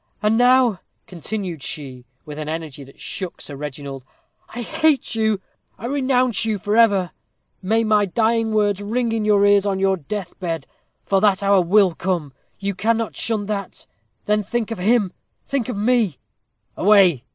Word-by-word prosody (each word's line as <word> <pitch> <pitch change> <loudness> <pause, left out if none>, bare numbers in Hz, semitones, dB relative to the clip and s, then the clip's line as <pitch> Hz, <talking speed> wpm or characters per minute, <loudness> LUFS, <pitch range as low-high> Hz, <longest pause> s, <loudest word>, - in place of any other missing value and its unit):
And 210 +1 +3
now," 245 -4 +4 0.3
continued 180 -2 -5
she, 130 -4 -7 0.2
with 150 -1 -8
an 155 0 -4
energy 155 -3 -5
that 135 0 -17
shook 185 -3 -6
Sir 145 - -8
Reginald, 140 -1 -7 0.5
"I 240 +1 -6
hate 300 +3 +1
you 220 -2 +1 0.4
I 220 - -8
renounce 255 -4 +1
you 220 -2 0
forever! 205 -3 +3 0.5
May 220 +4 +1
my 210 -2 +3
dying 225 +3 +1
words 205 -2 +1
ring 230 +3 -1
in 225 -1 -1
your 205 -1 +4
ears 205 0 +4
on 195 -1 0
your 195 0 +2
death 185 +3 -6
bed, 165 -3 -3 0.4
for 195 -1 +2
that 200 -1 +3
hour 200 -1 +4
will 185 +1 +4
come. 165 -5 -2 0.2
You 200 0 -3
cannot 225 +3 -1
shun 220 -3 -2
that. 200 -1 -5 0.4
Then 210 0 +2
think 230 +2 -3
of 225 - -4
him! 205 0 +2 0.3
think 265 -4 -2
of 235 - -3
me!" 215 - +1 0.6
"Away!" 185 - +4
205 Hz, 165 wpm, -21 LUFS, 180-225 Hz, 0.6 s, now